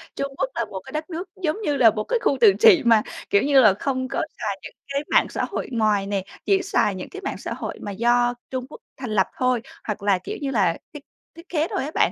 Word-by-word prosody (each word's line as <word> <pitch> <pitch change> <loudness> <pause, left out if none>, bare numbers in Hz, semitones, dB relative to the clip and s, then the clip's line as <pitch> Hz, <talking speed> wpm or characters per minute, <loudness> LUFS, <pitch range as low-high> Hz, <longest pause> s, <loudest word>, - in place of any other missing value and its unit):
Trung 275 0 -3
Quốc 270 -1 0
là 235 - -1
một 195 -3 -7
cái - - -10
đất 310 +2 -4
nước 355 +2 -5
giống 350 +5 -1
như 295 -7 0
là 235 -4 +7
một 215 0 -3
cái 485 - 0
khu - - +1
tự 425 -4 +8
trị 415 -8 +7
mà, 225 -2 +6 0.3
kiểu 200 - +4
như 280 -1 +4
là, 215 -5 +6
không 260 +4 -2
có - - -2 0.2
xài - - -3
những - - -10 0.2
cái 280 - 0
mạng - - +4
xã - - -2
hội - - -4
ngoài 215 -4 +1
nè. 200 -2 -1 0.2
Chỉ 390 -1 +3
xài 290 - +1
những 185 - -7
cái 390 - -9
mạng 390 - -4
xã - - -5
hội - - -6
mà 205 - -5
do 240 +3 +2 0.2
Trung 255 -1 -4
Quốc - - -12 0.2
thành 260 -3 -6
lập 190 -3 +2
thôi, 255 -2 +1 0.2
hoặc 210 -2 -4
là, 200 -2 +3
kiểu 180 - -6
như 275 -1 -2
là, 190 -9 +2 0.2
thiết 295 - -9 0.3
thiết 335 +2 -14
kế 320 -1 0
thôi - - -2
á 295 - -5
bạn. - - +3
255 Hz, 270 wpm, -23 LUFS, 210-305 Hz, 0.3 s, tự